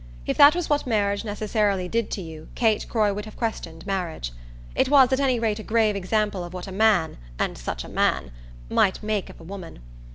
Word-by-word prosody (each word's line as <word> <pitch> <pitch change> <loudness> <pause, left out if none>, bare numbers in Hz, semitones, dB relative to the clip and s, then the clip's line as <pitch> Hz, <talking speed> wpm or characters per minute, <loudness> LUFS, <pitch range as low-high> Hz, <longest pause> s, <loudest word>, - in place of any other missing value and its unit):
If - - -1
that 285 +2 +8
was 355 -2 -1
what 290 -2 0
marriage 200 -3 +1
necessarily 205 -3 0
did 230 +3 -1
to 195 - -4
you 160 -1 -10
Kate 220 -3 +1
Croy 210 -3 +2
would 210 +2 -5
have 215 - -11
questioned 165 -8 -4
marriage. 175 - -3 0.4
It - - +1
was 270 -2 +6
at 260 - +2
any 260 -3 +2
rate 220 -2 0
a - - -6
grave 220 -2 +2
example 200 0 0
of 175 +1 -8
what 180 - -5
a 195 - -8
man 195 - +2 0.2
and - - -1
such - - -5
a - - -9
man! 65 -1 0 0.4
might 190 - +2
make 210 -2 -1
of - - -13
a - - -12
woman. 185 0 -8
205 Hz, 215 wpm, -24 LUFS, 180-225 Hz, 0.4 s, that